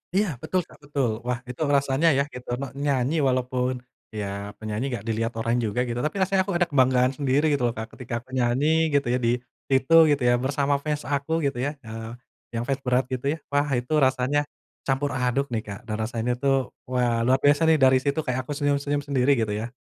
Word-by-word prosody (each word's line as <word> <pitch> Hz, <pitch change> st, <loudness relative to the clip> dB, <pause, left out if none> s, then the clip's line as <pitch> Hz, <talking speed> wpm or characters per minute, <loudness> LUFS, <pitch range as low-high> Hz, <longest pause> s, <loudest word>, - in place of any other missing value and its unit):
Iya, 205 Hz, +1 st, +3 dB
betul, 185 Hz, +6 st, 0 dB
Kak, -, -, -19 dB
betul. 135 Hz, -6 st, -1 dB
Wah 125 Hz, 0 st, -1 dB
itu 125 Hz, +5 st, -7 dB
rasanya 140 Hz, +2 st, +2 dB
ya, 140 Hz, -, +3 dB
gitu, 125 Hz, 0 st, -9 dB
ne 140 Hz, -, -3 dB
nyanyi 140 Hz, +2 st, +1 dB
walaupun, 125 Hz, 0 st, 0 dB, 0.4 s
ya 100 Hz, -1 st, -5 dB
penyanyi 110 Hz, +3 st, -4 dB
nggak 115 Hz, -4 st, -4 dB
dilihat 115 Hz, +1 st, -1 dB
orang 115 Hz, +2 st, 0 dB
juga 115 Hz, +2 st, 0 dB
gitu, 120 Hz, -1 st, -3 dB
tapi 150 Hz, +7 st, -2 dB
rasanya 190 Hz, 0 st, +2 dB
aku 190 Hz, -, -1 dB
ada 175 Hz, -, +3 dB
kebanggaan 130 Hz, -1 st, +4 dB
sendiri 145 Hz, +2 st, +2 dB
gitu 140 Hz, -4 st, 0 dB
loh, 115 Hz, -, -3 dB
Kak, 110 Hz, 0 st, -6 dB
ketika 120 Hz, -1 st, -5 dB
aku 130 Hz, -, -29 dB
nyanyi 140 Hz, +6 st, +2 dB
gitu 140 Hz, -3 st, +2 dB
ya, 125 Hz, -, +1 dB
di 120 Hz, 0 st, +2 dB, 0.3 s
situ 135 Hz, +4 st, +3 dB
gitu 145 Hz, -3 st, +2 dB
ya, 120 Hz, 0 st, +4 dB
bersama 140 Hz, +2 st, 0 dB
fans 150 Hz, 0 st, -3 dB
aku 145 Hz, +3 st, -1 dB
gitu 140 Hz, -3 st, -1 dB
ya, 145 Hz, +4 st, -2 dB
eee, 115 Hz, 0 st, -7 dB, 0.4 s
yang 115 Hz, -, -1 dB
fans 135 Hz, +2 st, -1 dB
berat 125 Hz, +1 st, +3 dB
gitu 130 Hz, +2 st, -2 dB
ya. -, -, -11 dB
Wah 145 Hz, +1 st, +2 dB
itu 125 Hz, +4 st, -3 dB
rasanya 130 Hz, +2 st, +2 dB, 0.4 s
campur 135 Hz, +1 st, 0 dB
aduk 130 Hz, +1 st, -1 dB
nih, 115 Hz, -, 0 dB
Kak, 100 Hz, +1 st, -6 dB
dan 110 Hz, -2 st, -4 dB
rasanya 115 Hz, +2 st, -1 dB
tuh, 135 Hz, -2 st, +1 dB, 0.2 s
wah 125 Hz, -2 st, +1 dB
luar 130 Hz, +1 st, +4 dB
biasa 145 Hz, +3 st, +4 dB
nih, 160 Hz, -, +6 dB
dari 130 Hz, -2 st, +5 dB
situ 140 Hz, +3 st, -1 dB
kayak 130 Hz, 0 st, -2 dB
aku 145 Hz, -, -3 dB
senyum-senyum 145 Hz, 0 st, 0 dB
sendiri 140 Hz, -1 st, +2 dB
gitu 110 Hz, -3 st, -1 dB
ya. 105 Hz, +2 st, -2 dB
130 Hz, 210 wpm, -25 LUFS, 120-145 Hz, 0.4 s, nih